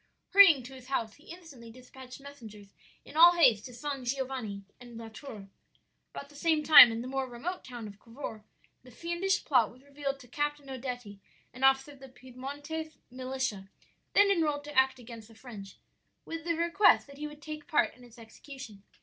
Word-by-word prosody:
"Hurrying 360 -10 +7
to 255 +3 -11
his 255 -1 -13
house, 230 -5 -2
he 295 - -22
instantly 320 -10 -12
dispatched 255 +2 -13
messengers 220 -8 -13 0.3
in - - -14
all 340 +2 +8
haste 230 -11 +4
to 250 - -10
San 275 +1 -5
Giovanni 250 -6 -4 0.2
and 240 -2 -12
La 225 -1 -8
Tour. 220 -3 -10 0.6
"About 280 - -9
the 290 - -18
same 315 +1 +1
time, 290 -6 +10
in 225 +1 -4
the - - -7
more 265 0 -3
remote 325 +10 -6
town 240 -4 -8
of 200 0 -13
Cavour, 230 -2 -9 0.4
the 255 - -17
fiendish 345 - -2
plot 250 -7 +3
was 255 +2 -19
revealed 280 -1 -5
to 250 - -15
Captain 290 +2 -3
Odetti, 245 -5 -7 0.3
an 255 - -8
officer 270 +2 +3
of 280 - -16
the 270 0 -12
Piedmontese 285 +5 -8
militia, 255 -6 -4 0.4
then 405 0 +5
enrolled 300 -6 0
to 295 0 -10
act 265 0 +3
against 230 -3 -11
the 225 - -18
French, 215 -5 -11 0.5
with 330 0 -7
a 335 - +1
request 340 +5 +4
that 280 0 -15
he 300 - -4
would 295 0 -12
take 305 0 -8
part 315 - +1
in 250 - -18
its 240 0 -17
execution. 230 -1 -12
265 Hz, 190 wpm, -30 LUFS, 235-295 Hz, 0.6 s, time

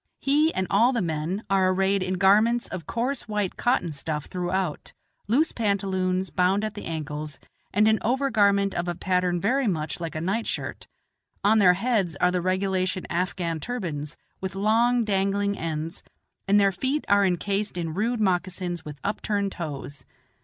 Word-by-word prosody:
He 300 +3 +3
and 190 - 0
all 235 +6 +4
the 240 - +1
men 165 +5 -2
are 190 -1 +3
arrayed 195 +1 +2
in 185 0 -1
garments 215 +6 +4
of 170 -5 -7
coarse 245 +3 -2
white 210 -3 -1
cotton 210 -9 +1
stuff 150 0 -3
throughout, 180 -2 -3 0.3
loose 280 +10 +2
pantaloons, 190 -3 0
bound 190 +3 +2
at 215 -1 -2
the - - -8
ankles, 150 -2 -5 0.3
and 210 +2 +3
an 220 0 +4
over 265 +4 0
garment 200 -3 +3
of 175 0 -2
a 175 - -2
pattern 180 -1 0
very 250 +7 +1
much 160 -5 -2
like 165 -2 -5
a - - -1
night 200 +7 -1
shirt; - - -4 0.6
on 215 +2 +5
their 180 -3 +6
heads 195 -5 0
are 180 +5 +2
the 180 -1 0
regulation 185 0 0
Afghan 175 -2 -1
turbans, 160 -8 -4 0.2
with 190 0 -4
long, 230 +4 +3
dangling 200 0 +1
ends, 160 -1 -4 0.5
and 200 +1 +5
their 200 -1 +4
feet 265 +10 -1
are 200 0 +4
incased 195 +2 -1
in 165 -2 -3
rude 225 +6 0
moccasins 180 -3 -1
with 150 -1 -8
upturned 200 -1 -1
toes. 145 -4 -6
190 Hz, 165 wpm, -25 LUFS, 175-210 Hz, 0.6 s, their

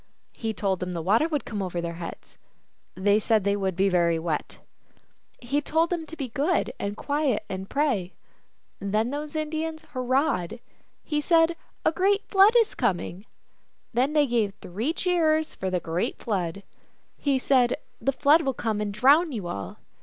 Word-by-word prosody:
He 225 -1 -3
told 195 -4 -1
them 180 0 -4
the 170 - -3
water 220 - +3
would 300 -4 -2
come 210 -3 -4
over 180 -2 -3
their 170 0 -3
heads. 170 - -9 0.6
They 200 +3 +3
said 220 -1 +2
that 200 +1 +1
would 190 -2 -1
be 195 +2 +3
very 170 -3 +2
wet. 160 -2 -3 0.8
He 275 +4 -1
told 325 +3 +1
them 330 -3 -2
to 325 - -8
be 270 -4 -4
good 290 +9 0
and 205 +1 -3
quiet, 285 -7 0
and 190 0 -6
pray. 250 -11 0 0.6
Then 215 +4 0
those 295 +1 -5
Indians 315 +1 -3
hur 255 - -4
rahed. 255 - 0 0.4
He 300 -1 -1
said, 330 +1 +4
" - - -40
A - - +5
great 395 +4 +1
Flood 400 +3 +6
is 460 -2 +3
coming." 195 -3 -2 0.7
Then 260 +5 +1
they 300 -1 +4
gave 225 -6 0
three 210 - -3
cheers 325 -3 +1
for 190 - -3
the 185 -1 0
great 165 +1 -2
Flood. 195 -3 -3 0.5
He 280 -2 +1
said, 255 -2 +3
" - - -41
The 275 - +2
Flood 295 +4 +4
will 270 -4 -1
come 220 -3 -1
and 210 -1 -2
drown 285 - +4
you 215 -8 -4
all." 100 - -5
240 Hz, 180 wpm, -26 LUFS, 195-305 Hz, 0.8 s, Flood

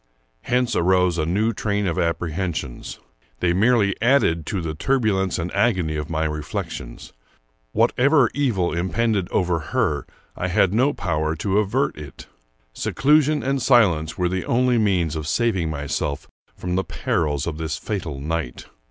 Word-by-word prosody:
Hence 125 -2 0
arose 90 -1 +2
a 80 - 0
new 105 +6 +1
train 105 -1 -1
of 85 -3 -1
apprehensions. 85 -4 -3 0.4
They 85 -1 +2
merely 100 0 +3
added 115 - +2
to 100 - -2
the 80 -2 -3
turbulence 100 - 0
and 85 0 -4
agony 95 -7 +1
of 75 0 -4
my 80 -1 -1
reflections. 75 -5 -5 0.6
Whatever 135 - +3
evil 115 -11 0
impended 95 +3 0
over 90 -2 +1
her, 75 - -1 0.3
I 90 - -2
had 90 +1 +2
no 130 +6 +3
power 80 - -1
to 100 +5 0
avert 105 - 0
it. 70 -3 -10 0.5
Seclusion 150 - +2
and 135 0 0
silence 100 - +3
were 90 - +1
the 95 0 -2
only 125 0 +2
means 90 -7 +1
of 75 -1 -4
saving 95 -2 0
myself 70 -1 -3 0.3
from 90 0 -4
the 95 +1 +1
perils 75 -7 -1
of 80 -2 -4
this 80 -1 -3
fatal 85 -10 -4
night. 75 -3 -4
90 Hz, 150 wpm, -22 LUFS, 80-115 Hz, 0.6 s, merely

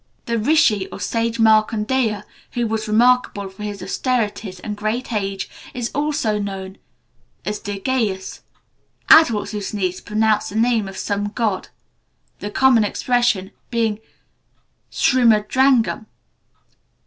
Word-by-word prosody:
The 235 -1 -1
rishi 225 -6 +3
or - - -9
sage 230 0 -1
Markandeya, 220 0 +2 0.3
who 240 -1 0
was 220 0 -2
remarkable 225 -3 +2
for 190 +2 -14
his 205 -2 -5
austerities 210 -3 -2
and 210 +2 -5
great 215 +4 -3
age, 195 -2 -2 0.3
is 240 -2 -3
also 290 -7 0
known 195 -1 -6 0.7
as 210 0 -3
Dirgayus. 205 -1 -2 0.7
Adults 235 -10 +6
who 210 -1 -4
sneeze 190 -2 -3
pronounce 215 0 +1
the 200 - -9
name 225 -2 +2
of 195 0 -9
some 205 0 -2
god, 210 -2 -2 0.7
the 205 - -5
common 245 0 +4
expression 220 -3 0 0.2
being 225 -3 0 0.9
"Srimadrangam." 240 0 +3
215 Hz, 115 wpm, -20 LUFS, 205-240 Hz, 0.9 s, Adults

